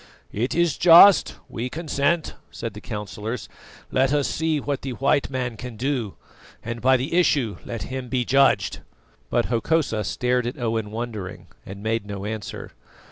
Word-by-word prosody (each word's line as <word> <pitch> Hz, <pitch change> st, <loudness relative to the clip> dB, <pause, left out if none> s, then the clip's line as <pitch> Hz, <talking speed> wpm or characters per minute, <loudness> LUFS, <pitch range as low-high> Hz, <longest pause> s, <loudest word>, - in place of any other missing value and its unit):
"It 120 Hz, +5 st, -2 dB
is 170 Hz, -3 st, +1 dB
just; 175 Hz, +3 st, +8 dB
we 120 Hz, +2 st, -4 dB
consent," 155 Hz, +1 st, -1 dB, 0.2 s
said 115 Hz, -, -6 dB
the 105 Hz, -, -9 dB
councillors. 105 Hz, +1 st, -5 dB, 0.4 s
"Let 130 Hz, +1 st, +2 dB
us 145 Hz, -2 st, +2 dB
see 160 Hz, -1 st, 0 dB
what 140 Hz, -1 st, -3 dB
the 135 Hz, -2 st, -4 dB
white 140 Hz, +3 st, +1 dB
man 125 Hz, -3 st, -3 dB
can 125 Hz, -2 st, -8 dB
do, 125 Hz, -5 st, -2 dB, 0.5 s
and 115 Hz, 0 st, -5 dB
by 130 Hz, +1 st, +5 dB
the 130 Hz, +7 st, -4 dB
issue 145 Hz, -, +2 dB
let 115 Hz, -2 st, -5 dB
him 130 Hz, -1 st, -5 dB
be 125 Hz, -1 st, 0 dB
judged." 135 Hz, +2 st, +3 dB, 0.5 s
But -, -, +1 dB
Hokosa 120 Hz, -2 st, 0 dB
stared 125 Hz, +3 st, 0 dB
at 125 Hz, -, -5 dB
Owen 115 Hz, -3 st, -2 dB
wondering, 110 Hz, -4 st, -6 dB, 0.2 s
and 100 Hz, +1 st, -8 dB
made 110 Hz, -1 st, -1 dB
no 100 Hz, -1 st, -5 dB
answer. 110 Hz, -1 st, -6 dB
125 Hz, 160 wpm, -24 LUFS, 110-140 Hz, 0.5 s, just